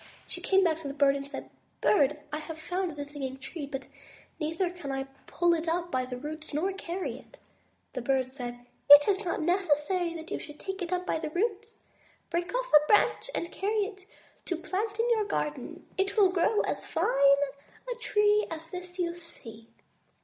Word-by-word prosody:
She - - -7
came 385 0 +4
back 325 -3 +2
to 310 - -6
the 280 - -5
bird 280 -1 +4
and 275 0 -5
said: - - -7 0.3
"Bird, 295 -6 +3
I 300 - -1
have 315 +1 -7
found 355 0 -2
the 290 -1 -4
Singing 275 -2 -5
Tree, 280 +2 -6
but 275 -1 -5 0.6
I 305 - 0
can 350 -3 -2
neither 270 0 -2 0.2
pull 345 0 +3
it 330 0 -1
up 345 +1 0
by 255 -1 0
the 250 0 -5
roots 305 +2 -6
nor 375 +6 +1
carry 370 0 -4
it." - - -18 0.6
The 255 - -3
Bird 260 +1 +1
replied: 245 -2 -7 0.2
"It 290 0 +11
is 405 +1 +2
not 340 -3 -1
necessary 345 0 +1
that 325 0 -8
you - - -1
should 300 -1 -10
take 385 0 -5
it 350 0 -3
up 360 0 0
by - - 0
the 310 -1 -3
roots. 430 +6 -2 0.5
Break 345 +2 -1
off - - -2
a 300 0 +7
branch 420 - +3
and 340 - -3
carry 415 +1 0
it 390 -2 -10 0.4
to 355 - -1
plant 405 +6 -3
in 460 - +3
your 435 -2 +3
garden. 400 - -3
It 390 +3 0
will 390 -3 +6
grow 375 +4 +3
as - - -2
fine 275 0 +4 0.5
a - - -2
tree 420 -1 +3
as 325 0 -7
this 360 0 -7
you 345 -2 0
see." 235 -10 -9
335 Hz, 200 wpm, -29 LUFS, 290-380 Hz, 0.6 s, It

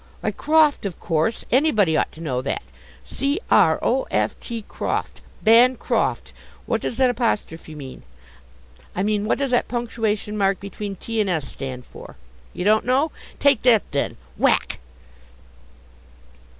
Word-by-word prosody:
Why, - - -1
croft, 305 -7 +3
of 180 - -8
course; 165 +6 -1
anybody 220 - +3
ought - - +1
to 160 - -11
know 130 -5 -1
that 135 - -3 0.4
c 280 +6 -1
r - - +5
o - - +1
f - - 0
t, 230 -3 -6
croft, - - -4 0.2
Bancroft! 240 +3 +3 0.3
What - - -1
does 230 - -4
that 260 -2 +4
apostrophe 185 -10 -2
mean? 135 -3 -9 0.9
I 185 - 0
mean, 210 0 0
what - - +1
does 275 -2 -1
that 245 - +2
punctuation 225 -3 -2
mark 195 -2 +1
between 200 0 -6
t 225 +3 -2
and 200 - 0
s 160 -6 -1
stand 130 -2 -7
for? - - -12 0.4
You 180 - -5
don't 215 +1 +4
know? 270 +5 +1 0.3
Take 280 -5 +4
that, 235 -4 +5
then! 140 - -1 0.2
(whack). - - +2
215 Hz, 150 wpm, -22 LUFS, 180-250 Hz, 0.9 s, r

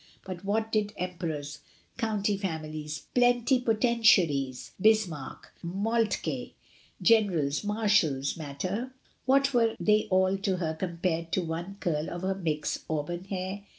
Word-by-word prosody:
But 185 -1 -7
what 220 +2 0
did 210 -1 0
emperors, 160 -5 -4 0.4
county 210 -3 0
families, 155 -5 -4
pleni 245 +1 +3
potentiaries, 210 - +3
Bismarck, 195 -10 +1
Moltke, 215 +6 -1 0.5
generals, 180 -11 +3
marshals, 205 -10 +2
matter 185 - -4
— - - -38
what 275 +1 +4
were 230 -2 +3
they 215 0 +3
all 190 +1 +3
to 195 -1 0
her 160 -3 -1
compared 170 -1 -2
to 185 - +1
one 170 +4 -5
curl 155 -4 -1
of 175 +1 -6
her 190 +1 +1
Mick's 160 -6 -2
auburn 160 +4 -3
hair? 190 +1 -4
185 Hz, 125 wpm, -28 LUFS, 160-215 Hz, 0.5 s, what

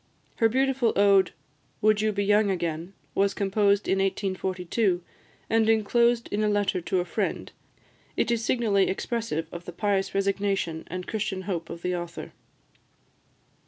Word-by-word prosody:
Her 225 - +4
beautiful 265 -1 +1
ode, 200 -1 +5 0.5
"Would 215 0 +3
you 215 0 +2
be 200 -1 -1
young 205 0 +4
again?" 170 -1 -3 0.2
was 200 0 +1
composed 200 0 +2
in 195 - +2
1842, 190 0 -1 0.4
and 225 0 +2
enclosed 235 +2 +3
in 210 +1 0
a 210 - +2
letter 205 -3 +1
to 180 +2 0
a - - -4
friend; - - -3 0.7
it - - +1
is 230 -1 0
signally 215 -5 +2
expressive 195 -5 -2
of 175 0 -8
the - - -6
pious 195 +1 -1
resignation 195 -4 -1
and 180 +1 -5
Christian 210 -3 -3
hope 170 -4 -4
of 170 - -8
the 180 0 0
author. 175 -1 -6
200 Hz, 150 wpm, -26 LUFS, 185-215 Hz, 0.7 s, ode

